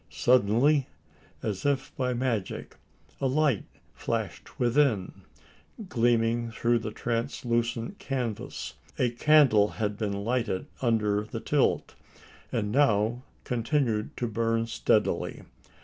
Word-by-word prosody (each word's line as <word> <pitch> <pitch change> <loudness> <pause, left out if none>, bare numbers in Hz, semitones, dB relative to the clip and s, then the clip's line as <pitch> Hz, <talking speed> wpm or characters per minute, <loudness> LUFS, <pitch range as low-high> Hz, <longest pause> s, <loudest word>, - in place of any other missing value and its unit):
Suddenly, 130 +4 +3 0.6
and, 110 - 0
as 95 -2 -7
if 140 -2 -1
by 125 -1 0
magic, 120 -5 -2 0.4
a 135 - +1
light 140 -3 +2 0.3
flashed - - -4
within, 120 -5 +2 0.8
gleaming 115 0 +2
through 115 +1 +1
the 110 - -4
translucent 120 - -2
canvas. 125 - -4 0.2
A 125 -2 +2
candle 125 -5 +5
had 105 -2 -1
been 100 -2 -2
lighted 115 -6 -1 0.2
under 105 -4 +1
the - - -5
tilt; - - +1 0.6
and 105 -2 -1
now 120 -3 +2 0.2
continued 120 -3 -1
to 125 - -1
burn 115 0 0
steadily. 115 - 0
115 Hz, 110 wpm, -28 LUFS, 110-130 Hz, 0.8 s, candle